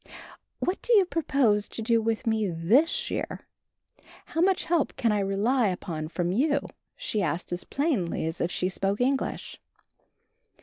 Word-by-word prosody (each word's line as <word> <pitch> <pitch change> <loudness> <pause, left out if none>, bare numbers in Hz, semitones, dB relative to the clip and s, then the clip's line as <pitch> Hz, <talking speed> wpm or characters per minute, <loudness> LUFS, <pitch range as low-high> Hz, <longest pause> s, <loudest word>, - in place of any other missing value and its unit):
"What 365 - -2
do 485 - -2
you 400 -4 +6
propose 265 - +1
to - - -7
do 230 0 +2
for 225 +2 -1
me 220 -3 +1
this 245 - +2
year? - - -3 0.8
How 325 - -2
much 375 +1 +3
help 330 -3 +1
can 230 -3 +1
I 210 - +1
rely 205 +5 +1
upon 170 -4 -3
from 175 +1 -2
you?" 285 +9 +2 0.3
she 365 - -2
asked 170 +1 -2
as 175 - -4
plainly 265 - -1
as 160 +1 -3
if 170 - +1
she 180 - -1
spoke 195 +2 -1
English. 265 +2 -1
220 Hz, 160 wpm, -27 LUFS, 185-285 Hz, 0.8 s, you